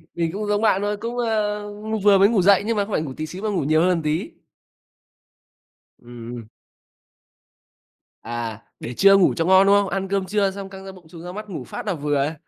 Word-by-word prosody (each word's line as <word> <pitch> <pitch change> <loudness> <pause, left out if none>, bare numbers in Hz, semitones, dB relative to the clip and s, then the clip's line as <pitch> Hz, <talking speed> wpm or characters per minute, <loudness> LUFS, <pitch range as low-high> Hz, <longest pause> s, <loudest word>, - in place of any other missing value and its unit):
mình 165 -1 -1
cũng 210 +1 -4
giống 205 +1 0
bạn 205 -3 +2
thôi, 205 0 -2
cũng, 235 +3 -5
ơ, 215 -3 -1 0.2
ng 220 0 -2
vừa 200 0 +5
mới 200 +2 +5
ngủ 215 -5 +2
dậy, 200 +1 +4
nhưng 225 -1 -1
mà 200 - +1
không 215 - -10
phải 155 - 0
ngủ 140 -4 -6
tí 155 - -3
xíu 180 +4 -9
mà 215 - 0
ngủ 190 -8 -1
nhiều 155 +2 +2
hơn 180 - +3
một 170 -3 +1
tí. 155 +1 -2 1.7
Ừm, 120 0 -10
ừm. 115 -2 -10 1.7
À, 115 -2 -5 0.2
để 120 - -6
trưa 195 +8 +6
ngủ 190 - +4
cho 165 - 0
ngon, 190 +1 +5
đúng 200 - +6
không? 200 -1 +2
Ăn 195 0 -3
cơm 195 0 -1
trưa 200 0 0
xong 195 0 -8
căng 195 0 -11
da 195 - -7
bụng, 185 -3 -16
chùng 165 0 -11
da 180 - -7
mắt, 210 +2 -8
ngủ 160 -9 -6
phát - - -8
là 200 - -1
vừa. 145 -1 -1
190 Hz, 235 wpm, -22 LUFS, 155-205 Hz, 1.7 s, trưa